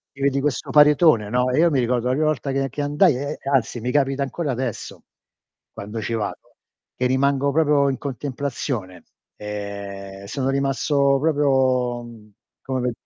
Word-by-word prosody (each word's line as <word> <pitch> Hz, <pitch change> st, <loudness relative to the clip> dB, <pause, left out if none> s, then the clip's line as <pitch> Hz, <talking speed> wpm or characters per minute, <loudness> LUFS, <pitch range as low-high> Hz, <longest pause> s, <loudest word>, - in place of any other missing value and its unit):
Ti 140 Hz, -, -11 dB
vedi 140 Hz, 0 st, +1 dB
questo 145 Hz, -2 st, -2 dB
paritone, 150 Hz, -7 st, +5 dB
no, 125 Hz, +2 st, +1 dB
e 130 Hz, -, +1 dB
io 170 Hz, +1 st, +5 dB
mi 140 Hz, -4 st, +1 dB
ricordo 120 Hz, 0 st, 0 dB
la -, -, +2 dB
prima 155 Hz, +3 st, +1 dB
volta 145 Hz, -2 st, -1 dB
che 135 Hz, 0 st, 0 dB
che 145 Hz, -, -5 dB
andai, 145 Hz, -1 st, +3 dB
e 140 Hz, +3 st, -3 dB
e 135 Hz, -, -5 dB
anzi, 120 Hz, -2 st, +1 dB
mi 125 Hz, +3 st, -2 dB
capita 135 Hz, -1 st, +1 dB
ancora 140 Hz, +1 st, -3 dB
adesso, 130 Hz, +1 st, -5 dB, 0.7 s
quando 105 Hz, +2 st, -6 dB
ci 115 Hz, -, -3 dB
vado, 105 Hz, -3 st, -5 dB, 0.4 s
che 125 Hz, -, -1 dB
rimango 140 Hz, +2 st, +2 dB
proprio 150 Hz, -2 st, +3 dB
in 135 Hz, -, -2 dB
contemplazione. 130 Hz, -, -4 dB, 0.3 s
Ehm, 100 Hz, -1 st, -7 dB
sono 130 Hz, +6 st, -2 dB
rimasto 140 Hz, 0 st, +1 dB
proprio, 130 Hz, -5 st, +1 dB
mhmm, 115 Hz, -3 st, -13 dB, 0.3 s
come 130 Hz, -2 st, -2 dB
135 Hz, 165 wpm, -22 LUFS, 120-140 Hz, 0.7 s, paritone